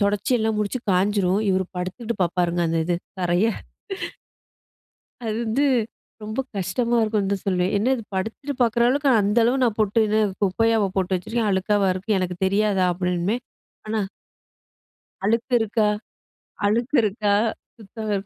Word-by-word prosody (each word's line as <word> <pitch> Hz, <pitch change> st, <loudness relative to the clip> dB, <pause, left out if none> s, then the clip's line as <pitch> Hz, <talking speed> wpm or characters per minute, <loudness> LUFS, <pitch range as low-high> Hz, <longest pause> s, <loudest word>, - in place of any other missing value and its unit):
தொடைச்சி 205 Hz, +5 st, +1 dB
எல்லாம் 220 Hz, -1 st, 0 dB
முடிச்சு 210 Hz, +5 st, -1 dB
காஞ்சிரும். 190 Hz, 0 st, +2 dB
இவர் 190 Hz, 0 st, +1 dB
படுத்துக்கிட்டு 215 Hz, +6 st, -3 dB
பார்ப்பாருங்க. 175 Hz, 0 st, 0 dB
அந்த 165 Hz, 0 st, 0 dB
இது 175 Hz, +1 st, 0 dB, 0.3 s
தரைய. 175 Hz, +4 st, +2 dB, 1.8 s
அது 220 Hz, -1 st, -1 dB
வந்து 265 Hz, +7 st, +1 dB, 0.6 s
ரொம்ப 215 Hz, +4 st, -4 dB, 0.2 s
கஷ்டமா 230 Hz, +6 st, 0 dB
இருக்கும்னு 210 Hz, -3 st, 0 dB
தான் 195 Hz, -, -4 dB
சொல்லுவேன். 185 Hz, 0 st, +1 dB
என்ன 230 Hz, +6 st, +1 dB
இது, 230 Hz, -, -6 dB
படுத்துட்டு 225 Hz, +9 st, -3 dB
பார்க்குற 235 Hz, 0 st, +3 dB
அளவுக்கு 280 Hz, +1 st, +2 dB
அந்த 205 Hz, +3 st, 0 dB
அளவு 255 Hz, +3 st, +2 dB
நான் 230 Hz, -4 st, +1 dB
போட்டு 215 Hz, +1 st, +3 dB
என்ன 215 Hz, +1 st, +2 dB, 0.2 s
குப்பையாவா 220 Hz, +2 st, +2 dB
போட்டு 185 Hz, 0 st, +1 dB
வச்சுருக்கேன்? 220 Hz, +4 st, -1 dB
அழுக்காவா 195 Hz, +1 st, +2 dB
இருக்கு? 195 Hz, +3 st, -1 dB
எனக்கு 180 Hz, -1 st, -2 dB
தெரியாதா? 200 Hz, -1 st, +2 dB
அப்படிம்பேன். 180 Hz, +5 st, -1 dB, 0.5 s
ஆனா 215 Hz, 0 st, 0 dB, 1.2 s
அழுக்கு 230 Hz, +5 st, 0 dB
இருக்கா? 220 Hz, -1 st, +1 dB, 0.8 s
அழுக்கு 235 Hz, +7 st, +1 dB
இருக்கா? 205 Hz, 0 st, +1 dB, 0.4 s
சுத்தம், 215 Hz, 0 st, -6 dB
210 Hz, 135 wpm, -23 LUFS, 190-225 Hz, 1.8 s, பார்க்குற